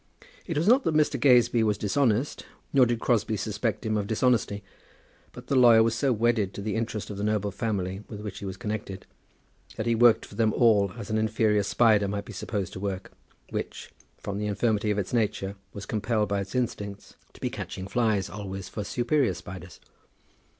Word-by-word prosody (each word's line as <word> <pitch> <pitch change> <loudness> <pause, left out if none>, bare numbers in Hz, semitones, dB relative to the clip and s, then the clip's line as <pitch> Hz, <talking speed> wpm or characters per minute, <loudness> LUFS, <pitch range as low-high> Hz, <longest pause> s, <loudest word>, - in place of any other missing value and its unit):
It 165 -5 -2
was 165 +5 +1
not 255 +4 +5
that 160 - +1
Mr. 155 -1 +2
Gazebee 120 -3 +5
was 105 -2 +1
dishonest; 120 +4 0 0.3
nor 130 -3 +6
did 120 -1 -1
Crosbie 110 -2 +1
suspect 110 +2 -2
him 110 -1 0
of 100 -1 -2
dishonesty; 110 -3 +1 0.7
but - - -11
the 140 - -1
lawyer 120 -3 +7
was 115 0 +1
so 135 +3 +1
wedded 115 -4 +1
to - - -5
the 105 - -2
interest 110 -2 -3
of 100 - -6
the 100 - -3
noble 105 -1 0
family 100 -3 -2
with 105 -1 -7
which 105 -2 -6
he 100 - -7
was 95 -1 -5
connected, 105 -4 -5 0.7
that - - -3
he 120 - +2
worked 120 0 +5
for - - -15
them 110 -2 +1
all 105 -5 +4
as 110 -2 -6
an 110 - +1
inferior 110 -1 +2
spider 105 0 +3
might 100 +1 -3
be 115 - -9
supposed 100 -1 -4
to - - -6
work, 95 -1 -4 0.4
which, - - -5 0.3
from 100 0 -5
the 105 - -2
infirmity 105 +1 0
of 105 - +1
its 100 +1 -3
nature, 100 -4 0 0.2
was 100 0 -8
compelled 110 0 0
by 100 -1 0
its 100 +5 -7
instincts 105 -5 -3 0.2
to - - -16
be - - -2
catching 95 0 -6
flies 110 -4 +1
always 95 -2 -6
for 105 - -5
superior 120 - +1
spiders. 90 +1 -10
110 Hz, 200 wpm, -27 LUFS, 100-120 Hz, 0.7 s, lawyer